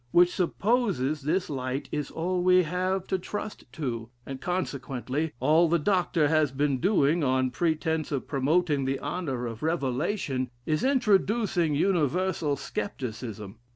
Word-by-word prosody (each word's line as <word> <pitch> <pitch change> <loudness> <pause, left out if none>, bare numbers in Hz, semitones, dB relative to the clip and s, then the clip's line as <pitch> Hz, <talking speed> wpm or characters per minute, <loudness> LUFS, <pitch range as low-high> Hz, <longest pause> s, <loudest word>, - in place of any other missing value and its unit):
which 175 +7 +5
supposes 185 - 0
this 170 +7 0
light 135 -1 -3
is 150 -2 -2
all 180 +2 -1
we 185 0 +5
have 185 +3 -1
to 190 - -1
trust 210 +3 -6
to; 120 -7 -4 0.2
and 135 -1 -7
consequently, 145 -4 -2
all 160 +6 +4
the 170 - +4
Dr. 175 -2 +2
has 155 -2 +2
been 140 -1 0
doing, 165 -3 +3
on 130 -1 +2
pretence 160 +1 0
of 135 -4 -2
promoting 145 +1 +1
the 135 +1 0
honor 145 -5 -3
of 115 -1 -6
revelation, 140 - -1 0.2
is 155 -1 0
introducing 215 - +2
universal 170 -2 +1
scepticism. 115 - -5
155 Hz, 135 wpm, -27 LUFS, 135-180 Hz, 0.2 s, which